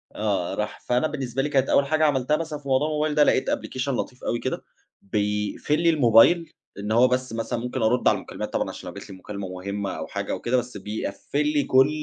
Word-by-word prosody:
.آه 100 -5 -1
راح 105 0 -3
فأنا 125 +5 +2
بالنسبة 135 -3 -3
لي 145 - -1
كانت 135 -2 +2
أوّل 140 - +4
حاجة 155 +2 +2
عملتها 145 0 +2
مثلًا 155 -2 -4
في 140 - -13
موضوع 135 +3 +2
الموبايل 150 -1 0
ده 150 - +6
لقيت 130 - +2
أبلكيشن 130 +2 -2
لطيف 125 - -5
أوي 120 - -1
كده 130 - -3 0.4
بيقفل 105 - -1
لي 170 - +4
الموبايل، 150 +4 +5 0.3
إن 105 +2 -4
هُو 120 +3 +6
بس 125 -1 -1
مثلًا 115 +1 -2
ممكن 125 +1 -3
أرد 125 +3 +2
على - - +5
المكالمات - - -7
طبعًا - - 0
عشان - - -8
لو - - -9
جات - - -9
لي 95 - -8
مكالمة 100 0 -6
مهمّة 100 +1 -4
أو - - -5
حاجة - - -4
أو - - -2
كده 125 +2 +1
بس 125 -3 -3
بيقَفّل 110 +8 -3
لي 145 -1 +2
كل 130 +2 +5
125 Hz, 225 wpm, -25 LUFS, 105-145 Hz, 0.4 s, ده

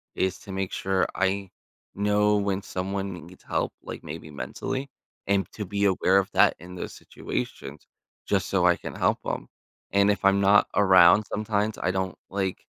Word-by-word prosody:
is 95 -1 -1
to 100 - -9
make 95 -1 -2
sure 95 -1 0
I 95 0 0 0.5
know 105 +1 +2
when 100 -1 -1
someone 95 +1 -3
needs 90 +1 -16
help, - - -2
like, - - -8
maybe 75 0 -8
mentally, 130 - -4 0.4
and 100 -3 +1
to 105 - -5
be 100 +2 -2
aware 95 -1 +3
of 100 -1 +1
that - - +4
in 90 +2 -10
those 90 - -6
situations 70 +2 -6 0.4
just - - 0
so - - +1
I - - +5
can - - -8
help - - +1
'em. - - -3 0.4
And 100 +1 +4
if 100 - -2
I'm 100 0 +4
not 100 +1 +5
around 95 0 +6
sometimes, 105 0 -1
I 95 - 0
don't, 95 -1 -2
like, 95 -1 -3
95 Hz, 175 wpm, -26 LUFS, 95-100 Hz, 0.5 s, around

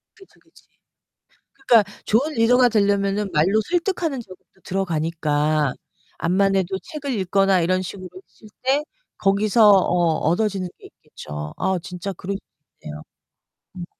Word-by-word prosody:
그치, 390 -4 -20
그치. - - -24 1.1
그러니까 230 -3 +7 0.2
좋은 275 +9 +1
리더가 245 +1 +4
되려면은 200 -1 +1
말로 190 +9 +3
설득하는 345 -5 -1
저기도 190 -2 -17
들어가니까 155 -5 0 0.4
암만해도 190 +1 +1
책을 290 -2 -6
읽거나 195 0 +2
이런 185 +2 +1
식으로 185 0 -7 0.2
했을 215 - -18 0.2
때 270 +3 +2 0.3
거기서 210 +2 +4
어 175 -4 +3
얻어지는 195 0 0
게 - - -13
있겠죠. 75 0 -9
아 190 0 0
진짜 180 +2 -6
그럴 190 +2 -5
수 - - -5 0.5
있네요. 75 0 -8 0.7
음. 175 - -6
195 Hz, 300 characters per minute, -22 LUFS, 175-220 Hz, 1.1 s, 그러니까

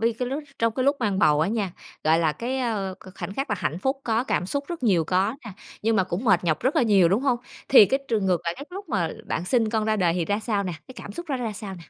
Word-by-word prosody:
Bây 230 +1 +2
cái 250 -1 -1
lúc 285 +3 -3 0.2
trong 230 -1 +1
cái 255 - 0
lúc 280 +1 +3
mang 205 -4 0
bầu 150 -4 +4
á 165 - +2
nha, 205 -5 -1 0.3
gọi 160 +1 +4
là 160 -2 +2
cái, 255 +7 -3
a, 210 -7 -2
k 185 - -13
khoảnh 190 +3 -5
khắc 270 -2 -3
là 205 - +1
hạnh 175 -2 -2
phúc 265 +6 -1
có, 230 +2 +1
cảm 180 -9 0
xúc 280 +6 -2
rất 340 -6 -5
nhiều 180 -8 +3
có 190 +7 +1
nè, 215 - -7 0.3
nhưng 225 0 +2
mà 190 - +3
cũng 185 +6 -4
mệt 195 -4 +3
nhọc 160 -3 +1
rất 260 +4 0
là - - +5
nhiều, 200 -6 +5
đúng 200 +8 +1
hông? 255 -4 +2 0.3
Thì 250 -6 +9
cái 270 +6 +1
trường 210 -4 +1
ngược 180 -2 +2
lại, 170 0 -1
cái 280 - -7
lúc 395 +2 -8
mà 180 -7 0 0.2
bạn 170 - -2
sinh 225 +2 +1
con 220 -1 0
ra 215 0 +1
đời 175 -4 +2
thì 175 -2 0
ra 205 +3 0
sao 210 -3 -1
nè, 185 - -3 0.2
cái 260 - -10
cảm 200 - -8
xúc 345 +7 -7
đó 275 - 0
nó 250 - -4
ra 220 - -2
sao 205 -1 -7
nè? - - -11
215 Hz, 315 wpm, -25 LUFS, 185-250 Hz, 0.3 s, Thì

